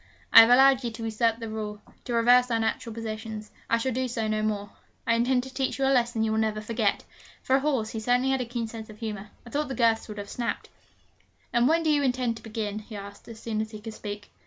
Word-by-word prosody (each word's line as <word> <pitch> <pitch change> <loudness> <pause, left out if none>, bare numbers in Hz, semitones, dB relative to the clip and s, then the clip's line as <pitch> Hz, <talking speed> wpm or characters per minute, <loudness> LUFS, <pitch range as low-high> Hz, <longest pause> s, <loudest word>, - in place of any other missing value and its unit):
I - - +12
have 225 0 +9
allowed 265 +1 +6
you 240 - -1
to 225 0 -7
usurp 225 0 +1
the 230 -1 -6
rule, 215 -1 -5 0.3
to 245 - -3
reverse 245 +2 +5
our 230 - +1
natural 225 +1 -2
positions. 220 -1 -6 0.2
I 230 - +4
shall 260 +3 -1
do 255 +1 -1
so 230 -2 -2
no 215 0 0
more. 205 -1 -2 0.3
I 230 - +3
intend 245 +2 +2
to 265 0 -10
teach 265 0 -1
you 270 - +1
a 270 - +3
lesson 240 -3 +1
you 220 - 0
will 220 - +1
never 215 -1 0
forget.' 215 -1 0 0.4
For 260 - +3
a - - +1
horse, 265 -7 0
he 225 - -4
certainly 245 +4 +2
had 265 -1 +1
a - - -2
keen 235 -1 -3
sense 220 0 -8
of 215 - -11
humour. 210 -2 -5 0.2
I 235 - -11
thought 295 +1 -1
the 265 - -4
girths 230 -1 +2
would 210 -1 -8
have 205 0 -6
snapped. 235 +1 -4 0.8
'And 240 +1 +4
when 330 +2 +3
do 315 - +2
you 295 -1 +3
intend 250 -3 0
to - - -12
begin?' 215 -2 -4
he 215 +1 -11
asked, 200 0 -9
as 225 -1 -10
soon 220 -2 -2
as 220 - -4
he 215 -1 -9
could 220 +1 -8
speak. 205 -1 -7
230 Hz, 260 wpm, -27 LUFS, 215-250 Hz, 0.8 s, I